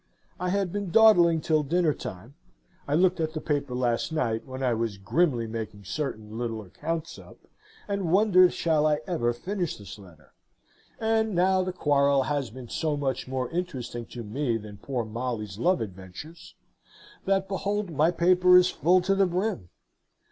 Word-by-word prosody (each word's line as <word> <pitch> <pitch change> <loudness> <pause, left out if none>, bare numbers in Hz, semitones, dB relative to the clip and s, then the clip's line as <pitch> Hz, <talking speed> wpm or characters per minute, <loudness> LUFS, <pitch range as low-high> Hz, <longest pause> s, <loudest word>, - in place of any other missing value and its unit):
I 180 - -1
had 195 -1 0
been 205 -1 -3
dawdling 175 -6 +6
till 155 0 +2
dinner 160 +2 +1
time 105 +4 -8 0.5
(I 145 - +1
looked 180 +1 +3
at 160 -1 -1
the 155 - -3
paper 145 -4 -2
last 125 +3 0
night, 115 -7 -1
when 130 0 -6
I 125 -2 +2
was 115 -3 -2
grimly 120 - +1
making 110 -2 -6
certain 110 - -5
little 115 -2 -3
accounts 160 - -5
up, - - -14 0.5
and 200 -5 -2
wondered 185 -2 +5
shall 155 -2 +1
I 150 -1 +1
ever 160 -11 0
finish 180 - -3
this 105 +1 -10
letter?), 85 -6 -17 0.7
and 220 -2 +1
now 185 +2 +3
the 185 0 -2
quarrel 140 -5 +2
has 140 -3 -2
been 125 +1 -10
so 150 +4 -1
much 135 -3 -2
more 130 -1 -3
interesting 130 -9 -4
to 120 - -8
me 115 +2 -1
than 105 -2 -10
poor 120 +2 -3
Molly's 110 -3 -4
love 175 -2 +2
adventures, 95 - -9 0.7
that 195 0 +1
behold 200 0 -2
my 155 +2 +3
paper 180 +1 +5
is 180 0 +4
full 180 +3 +3
to 190 +2 +1
the 195 -1 +3
brim! 180 - -2
150 Hz, 170 wpm, -27 LUFS, 120-180 Hz, 0.7 s, dawdling